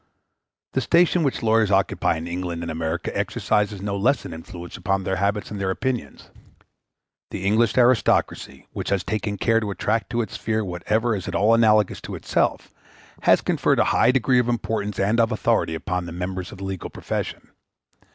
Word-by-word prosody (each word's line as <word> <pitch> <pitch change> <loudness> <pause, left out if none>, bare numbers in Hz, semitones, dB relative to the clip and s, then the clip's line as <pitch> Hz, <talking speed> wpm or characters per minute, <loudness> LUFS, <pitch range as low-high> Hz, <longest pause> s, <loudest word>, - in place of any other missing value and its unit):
The 130 - 0
station 170 +6 +3
which 135 -4 -1
lawyers 110 -2 +3
occupy 95 -4 +1
in 80 - -6
England 85 -1 -4
and 85 - -4
America 80 0 -3
exercises 105 -2 0
no 100 -1 -2
less 120 +8 +1
an - - -6
influence 85 +2 -9
upon 95 -1 -1
their 95 +1 -1
habits 100 +2 -1
and 100 -1 -5
their 95 - 0
opinions. 125 +5 -3 1.0
The 95 - -5
English 110 +3 +2
aristocracy, 125 -1 +2
which - - -4
has 100 -2 0
taken 100 0 -2
care 115 +3 +2
to 110 -2 -3
attract 110 +1 -1
to 120 +1 0
its - - -9
sphere 110 -1 -1
whatever 105 +6 0
is 95 - -5
at 85 - -4
all 105 +5 +4
analogous 110 -3 +3
to - - -6
itself, - - -1 0.5
has - - +4
conferred - - +1
a - - +4
high - - +4
degree 130 0 +3
of 120 -1 +1
importance 105 -4 -2
and 105 +4 +2
of 115 -1 +3
authority 90 -5 +1
upon 90 +1 -3
the - - -7
members 90 +1 -4
of - - -10
the 95 - -8
legal 95 -2 -5
profession. - - -5
105 Hz, 185 wpm, -23 LUFS, 95-115 Hz, 1.0 s, all